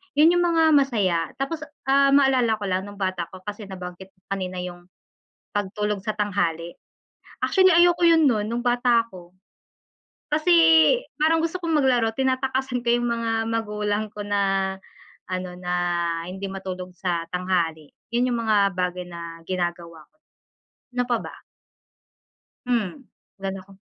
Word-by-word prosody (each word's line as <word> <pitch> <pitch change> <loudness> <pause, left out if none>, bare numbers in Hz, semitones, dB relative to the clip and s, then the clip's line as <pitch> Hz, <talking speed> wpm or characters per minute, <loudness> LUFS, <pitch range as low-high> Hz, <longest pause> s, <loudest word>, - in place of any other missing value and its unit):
yun 310 +3 +6
yung 350 - +3
mga 330 -1 +3
masaya. 225 - +3 0.2
Tapos 295 +4 -2 0.3
ah, 275 0 +5
maalala 260 -5 +4
ko 210 - -9
lang 190 +2 -1
nung 205 - -10
bata 185 -3 -2
ko 185 0 -12
kasi 205 0 -7
nabanggit 185 0 -8
mo 185 - -37
kanina 185 -2 -3
yung 175 0 -9 0.7
pagtulog 205 0 -2
sa 215 0 -2
tanghali. 175 -5 -1 0.7
Actually, 375 -2 +4
ayoko 345 +1 +5
'yon 325 -3 +6
no'n 215 -4 +1
no'ng 235 +1 -2
bata 240 -1 +3
ako. 180 -3 -13 1.0
Kasi 310 +4 +2 0.7
parang 325 +1 +4
gusto 330 +2 -1
kong 325 -2 +1
maglaro 240 -4 +3
tinatakasan 265 -1 -1
ko 240 - -4
yung 240 0 -1
mga 230 -1 -1 0.2
magulang 210 -1 -1
ko 205 -1 -7
na 195 -1 +1 0.6
ano 185 -1 -4
na 180 0 -4 0.6
hindi 195 +1 -5
matulog 185 -1 -6
sa 175 -2 -2
tanghali, 175 -4 -1 0.2
yun 250 +1 +2
yung 235 -1 -1
mga 200 -3 +3
bagay 180 0 -1
na 170 -1 -8
ginagawa 175 -3 -4
ko. 310 - -42 0.8
Ano 250 0 +1
pa 240 -1 +1
ba? - - -8 1.3
Hmm, 240 +1 -1 0.3
wala 195 0 -5
na 195 - -6
ako 190 0 -18
205 Hz, 150 wpm, -24 LUFS, 185-250 Hz, 1.3 s, yun